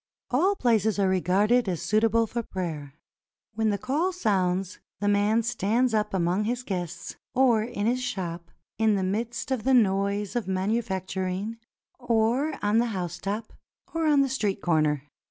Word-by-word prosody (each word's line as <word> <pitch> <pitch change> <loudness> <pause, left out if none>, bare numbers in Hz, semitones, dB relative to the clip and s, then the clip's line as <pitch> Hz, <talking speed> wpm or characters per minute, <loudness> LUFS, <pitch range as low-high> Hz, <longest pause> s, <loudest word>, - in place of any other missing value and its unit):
All 360 +11 +3
places 220 - +2
are 200 -1 +2
regarded 195 +5 +2
as 175 -3 -2
suitable 225 +1 +2
for 235 +2 -3
prayer. 160 -9 -5 0.6
When 220 0 +1
the 205 - 0
call 290 - 0
sounds, 190 - 0 0.2
the 205 - -1
man 205 +3 +3
stands 230 +2 +1
up 210 -1 +1
among 185 +2 0
his 245 +2 -2
guests, 180 -7 -5 0.2
or 245 -4 +4
in 215 -2 -3
his 250 +3 +1
shop, 175 -8 -4 0.3
in 220 -1 +3
the 195 - 0
midst 230 +7 -3
of 255 -5 -1
the 265 +1 +4
noise 200 -2 +1
of 240 -4 -1
manufacturing, 190 0 -2 0.4
or 245 +5 +1
on 205 +2 +3
the 240 - +2
housetop, 195 +5 -4 0.4
or 330 -1 0
on 290 -2 +5
the 275 - +2
street 210 -7 -1
comer. 155 -5 +1
210 Hz, 155 wpm, -26 LUFS, 190-240 Hz, 0.6 s, on